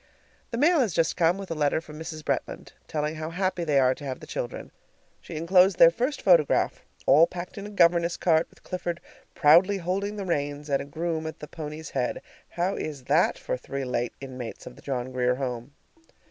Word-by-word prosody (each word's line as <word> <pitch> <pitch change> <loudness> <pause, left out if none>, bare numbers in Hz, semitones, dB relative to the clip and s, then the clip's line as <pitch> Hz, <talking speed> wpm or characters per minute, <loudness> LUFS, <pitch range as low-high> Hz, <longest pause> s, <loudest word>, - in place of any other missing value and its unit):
The 230 - -4
mail 320 +5 +4
has 225 -10 +1
just 165 -2 +2
come, 170 +1 +3
with 195 -3 -7
a - - +1
letter 150 -1 +1
from 155 -2 -11
Mrs. 155 -1 -7
Bretland, - - -3 0.2
telling 155 0 -2
how 155 0 -4
happy 185 0 -1
they 150 -4 +1
are 130 -1 +4
to 145 - -13
have 130 -2 -4
the - - -10
children. 120 - -5 0.5
She 170 - -10
inclosed 180 +4 +4
their 165 - +8
first 250 - -2
photograph 170 -6 +3 0.2
all 165 +3 +6
packed 175 0 -7
in 200 - -6
a - - -8
governess 170 -3 +3
cart, 160 -2 +2
with - - -24
Clifford 175 -2 -4 0.4
proudly 170 +6 +5
holding 195 +3 -2
the 200 -2 -5
reins, 145 -3 -2
and 140 - +2
a - - -6
groom 160 +2 -3
at 160 - -7
the 150 - -9
pony's 155 +1 -7
head. 125 -2 -2 0.3
How 180 +3 -1
is 145 -4 -5
that - - +2
for - - -3
three 140 - -5
late 120 -1 -2
inmates 130 -3 -8
of 125 - -10
the - - -16
John 130 -2 -3
Grier 125 0 +1
Home? 125 0 -5
160 Hz, 205 wpm, -26 LUFS, 140-180 Hz, 0.5 s, their